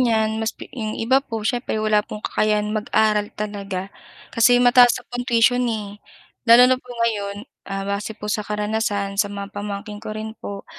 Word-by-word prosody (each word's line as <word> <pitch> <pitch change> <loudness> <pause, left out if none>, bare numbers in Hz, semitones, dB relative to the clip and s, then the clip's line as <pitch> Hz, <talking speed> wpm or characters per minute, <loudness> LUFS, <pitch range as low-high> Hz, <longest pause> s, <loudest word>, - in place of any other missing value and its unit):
niyan 220 -2 +1
mas 220 0 -2
pi - - -9
'yong 220 -5 -4
iba 260 +4 +3
po 225 -5 -6
siyempre 240 +1 -1
wala 215 -1 +2
pong 210 0 -9
kakayahan 210 0 0
mag-aral 215 -1 +1
talaga. 200 -2 -5 0.4
Kasi 245 +1 +5
mataas 245 0 +6
na - - -8
po 245 0 -5
ang 245 - -6
tuition, 240 +1 +4
eh. 210 -2 -5 0.5
Lalo 235 +2 +9
na 255 0 +3
po 250 - -23
ngayon, 225 -4 -2 0.3
ah, 195 0 -3
base 200 +2 -3
po 210 - -6
sa 215 - -1
karanasan 210 -1 -2
sa 205 - +1
mga 200 0 -7
pamangkin 205 +1 -6
ko 220 0 -7
rin 220 0 -5
po- 200 -1 -7
215 Hz, 190 wpm, -22 LUFS, 205-230 Hz, 0.5 s, Lalo